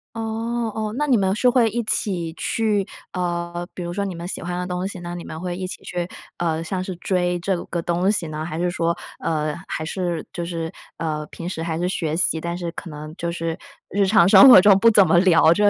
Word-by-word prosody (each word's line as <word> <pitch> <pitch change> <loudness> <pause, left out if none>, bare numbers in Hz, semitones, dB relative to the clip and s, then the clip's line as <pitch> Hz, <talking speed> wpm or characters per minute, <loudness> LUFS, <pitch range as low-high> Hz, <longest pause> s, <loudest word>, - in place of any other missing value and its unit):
哦 225 +1 -2
哦， 215 0 -3
那 295 - +1
你 265 -4 +3
们 190 0 +1
是 250 - +2
会 235 -3 +4
一 235 +2 -2
起 175 -6 -1
去， 210 0 0 0.3
呃， 175 -1 -3
比 180 - -5
如 175 0 -4
说 200 +1 -1
你 190 -3 -4
们 170 +1 -6
喜 - - -5
欢 175 0 -4
的 180 - -2
东 180 +1 -2
西， 190 -2 -7
那 175 0 -6
你 175 - -6
们 160 - -7
会 180 0 -3
一 185 0 -4
起 - - -8
去， 175 -1 -3 0.3
呃， 165 -1 -1
像 185 +2 -3
是 185 -1 -5
追 180 0 0
这 190 +2 0
个 170 - -3
东 175 +3 +1
西 185 -5 -1
呢？ 155 0 -4
还 160 0 -5
是 175 +1 0
说， 170 0 0 0.2
呃， 155 -2 -1
还 155 - -3
是 175 -1 -3
就 170 - -3
是， 165 -1 -4 0.3
呃， 155 -2 -2
平 170 - -8
时 165 -3 -4
还 165 -1 -2
是 175 +1 0
学 160 -4 -1
习， 160 -1 +2
但 170 +1 -3
是 170 -2 -4
可 175 - -8
能 155 +1 -8
就 170 0 -2
是 165 0 -3 0.3
日 200 0 +1
常 185 -4 +5
生 270 +6 +9
活 240 - +11
中 195 0 +6
不 230 - +6
怎 205 -3 +6
么 175 - +5
聊 165 -3 +5
这 205 +2 +2
175 Hz, 260 characters per minute, -22 LUFS, 170-195 Hz, 0.3 s, 活